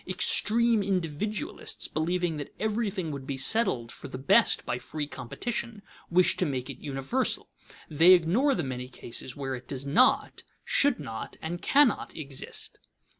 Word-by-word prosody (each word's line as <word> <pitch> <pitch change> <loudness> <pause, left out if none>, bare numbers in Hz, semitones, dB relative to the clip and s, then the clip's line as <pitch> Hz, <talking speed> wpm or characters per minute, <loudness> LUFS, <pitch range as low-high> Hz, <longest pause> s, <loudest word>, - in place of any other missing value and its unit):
Extreme 220 +4 +2
individualists, 200 - -2
believing 170 +1 -1
that 145 - -7
everything 210 -6 -1
would 140 -2 -7
be 140 - -3
settled 135 - +2
for - - -8
the 130 - -7
best 135 +2 +4
by 125 - -2
free 150 +4 -4
competition, 210 - -5 0.3
wish 180 +1 +4
to 185 - +1
make 130 -1 -3
it 130 - -11
universal. 140 - -2 0.4
They 165 +4 +6
ignore 190 - +3
the 175 - -1
many 125 -1 -5
cases 125 0 -6
where 135 -2 -4
it 125 -1 -7
does 135 -1 -5
not, 235 - +3 0.2
should 285 - +2
not, 115 -6 -7
and 175 +2 -5
cannot 280 -5 +3
exist. 140 -4 -5
160 Hz, 150 wpm, -28 LUFS, 135-210 Hz, 0.4 s, They